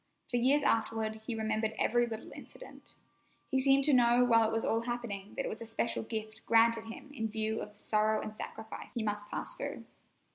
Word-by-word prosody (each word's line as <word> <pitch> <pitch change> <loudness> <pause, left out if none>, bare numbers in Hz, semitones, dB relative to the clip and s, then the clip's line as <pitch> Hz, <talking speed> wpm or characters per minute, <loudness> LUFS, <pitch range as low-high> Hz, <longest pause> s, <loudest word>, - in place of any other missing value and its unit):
For 245 - +2
years 270 +5 +4
afterward 220 -1 +1
he 235 - -1
remembered 220 0 -1
every 240 0 +2
little 225 -1 -7
incident. - - -10 0.6
He 265 -1 +2
seemed 275 +1 +4
to 295 - +4
know 245 0 +5
while 230 -2 +5
it - - -4
was 225 0 0
all 225 - +1
happening 230 -4 -4
that - - -2
it - - -1
was 220 - -5
a 230 - -6
special 225 +1 -1
gift 220 -1 -5
granted 230 0 +5
him 230 +5 -9
in 225 -5 -2
view 220 0 -2
of 210 - -7
the - - -22
sorrow 215 +1 +2
and 215 - -6
sacrifice 220 +1 -8
he 235 - -1
must 210 -1 -3
pass - - -2
through. - - -5
225 Hz, 210 wpm, -32 LUFS, 220-240 Hz, 0.6 s, know